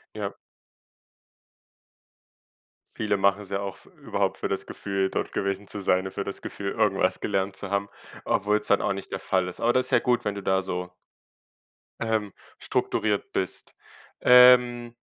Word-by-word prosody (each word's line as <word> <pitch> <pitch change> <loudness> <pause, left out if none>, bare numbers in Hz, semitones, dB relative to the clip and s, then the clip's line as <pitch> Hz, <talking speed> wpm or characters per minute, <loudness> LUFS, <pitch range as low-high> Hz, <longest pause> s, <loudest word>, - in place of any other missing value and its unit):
Ja. 100 -2 -4 2.6
Viele 105 -1 0
machen's 100 0 +1
ja 100 0 -1
auch 100 -1 -5
f - - -19
überhaupt - - -1
für - - -2
das - - -3
Gefühl, 95 -1 -2
dort - - -3
gewesen 100 +1 -2
zu 100 - -5
sein, 95 0 +2
ne, 95 - -5
für 100 - -3
das 100 - -6
Gefühl, 100 -1 -5
irgendwas 95 -2 +1
gelernt 95 -1 -1
zu 100 - -5
haben, 100 0 -1 0.3
obwohl's 105 +1 +1
dann - - +3
auch - - 0
nicht 100 - -8
der 95 - -3
Fall 95 -1 0
ist. 90 - -9
Aber 120 +1 +2
das 130 0 +2
ist - - -5
ja - - +5
gut, 125 -1 +1
wenn 105 - -2
du 100 - -5
da 95 0 +1
so 90 -1 -4 1.1
ähm, 110 -3 -1 0.3
strukturiert 105 -2 -1
bist. 95 - -4 0.5
Ähm, 125 -1 +6
100 Hz, 165 wpm, -26 LUFS, 95-105 Hz, 2.6 s, Ähm